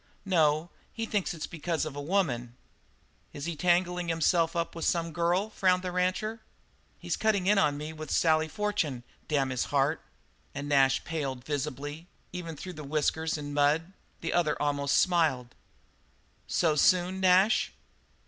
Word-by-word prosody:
"No, 160 Hz, -3 st, +2 dB, 0.2 s
he 225 Hz, -, -4 dB
thinks 205 Hz, -4 st, -1 dB
it's 165 Hz, -3 st, -5 dB
because 165 Hz, 0 st, -2 dB
of 155 Hz, -2 st, -6 dB
a 145 Hz, -, -4 dB
woman." 140 Hz, -9 st, -1 dB, 0.8 s
"Is 145 Hz, -, -6 dB
he 170 Hz, -1 st, -3 dB
tangling 180 Hz, +1 st, +1 dB
himself 165 Hz, 0 st, +2 dB
up 170 Hz, 0 st, -1 dB
with 165 Hz, -, -6 dB
some 170 Hz, -1 st, 0 dB
girl?" 175 Hz, +6 st, +1 dB
frowned 185 Hz, -2 st, +2 dB
the 180 Hz, -, -3 dB
rancher. 185 Hz, +5 st, -1 dB, 0.6 s
"He's -, -, -3 dB
cutting 210 Hz, -4 st, +1 dB
in 200 Hz, +1 st, +4 dB
on 145 Hz, -2 st, +2 dB
me 150 Hz, +2 st, -6 dB
with 155 Hz, -1 st, -8 dB
Sally 160 Hz, -1 st, +3 dB
Fortune 160 Hz, -, -2 dB, 0.2 s
damn 140 Hz, -3 st, +1 dB
his 125 Hz, -, -1 dB
heart!" 145 Hz, +2 st, +1 dB, 0.5 s
And 140 Hz, +1 st, -4 dB
Nash 135 Hz, -2 st, +3 dB
paled 140 Hz, -7 st, -4 dB
visibly, 145 Hz, +2 st, -4 dB, 0.3 s
even 170 Hz, -3 st, -5 dB
through 185 Hz, +5 st, -7 dB
whiskers 155 Hz, +2 st, 0 dB
and 145 Hz, -1 st, -6 dB
mud. 150 Hz, +5 st, +2 dB, 0.3 s
The -, -, -2 dB
other 160 Hz, -4 st, +1 dB
almost 145 Hz, -1 st, +1 dB
smiled. 155 Hz, -9 st, +2 dB, 0.9 s
"So 160 Hz, -3 st, +2 dB
soon, 185 Hz, +4 st, +3 dB
Nash?" 190 Hz, +3 st, +4 dB
160 Hz, 150 wpm, -29 LUFS, 145-180 Hz, 0.9 s, in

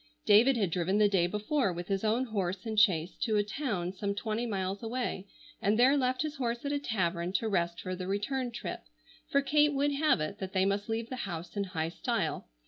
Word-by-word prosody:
David 235 Hz, +5 st, +6 dB
had 200 Hz, -6 st, 0 dB
driven 180 Hz, +4 st, +1 dB
the 210 Hz, -1 st, +5 dB
day 190 Hz, -4 st, +2 dB
before 210 Hz, +4 st, 0 dB
with 175 Hz, +1 st, -6 dB
his 195 Hz, 0 st, -1 dB
own 225 Hz, +4 st, +2 dB
horse 195 Hz, -4 st, -2 dB
and 220 Hz, -2 st, +1 dB
chaise 180 Hz, -5 st, +3 dB
to 225 Hz, -5 st, +1 dB
a 205 Hz, -, +3 dB
town 205 Hz, -6 st, -3 dB
some 200 Hz, +1 st, -2 dB
twenty 220 Hz, +3 st, -2 dB
miles 195 Hz, -2 st, -2 dB
away, 230 Hz, -4 st, -3 dB, 0.3 s
and 205 Hz, +2 st, +2 dB
there 255 Hz, +4 st, +6 dB
left 255 Hz, 0 st, +1 dB
his 310 Hz, 0 st, -4 dB
horse 240 Hz, 0 st, -2 dB
at 285 Hz, -, -1 dB
a 290 Hz, -, 0 dB
tavern 180 Hz, -8 st, -1 dB
to 220 Hz, +4 st, 0 dB
rest 170 Hz, -4 st, 0 dB
for 185 Hz, 0 st, -4 dB
the 180 Hz, 0 st, -5 dB
return 245 Hz, +6 st, -1 dB
trip, 235 Hz, -, -5 dB, 0.5 s
for 280 Hz, 0 st, +2 dB
Kate 295 Hz, +1 st, +3 dB
would 285 Hz, +1 st, +2 dB
have 300 Hz, -, +3 dB
it 155 Hz, 0 st, -4 dB
that 190 Hz, -1 st, -5 dB
they 190 Hz, -1 st, +3 dB
must 200 Hz, +2 st, -1 dB
leave 225 Hz, +1 st, -2 dB
the 255 Hz, -, -5 dB
house 170 Hz, +2 st, -6 dB
in 200 Hz, -1 st, 0 dB
high 165 Hz, -4 st, -2 dB
style. -, -, -2 dB
210 Hz, 220 wpm, -30 LUFS, 185-250 Hz, 0.5 s, David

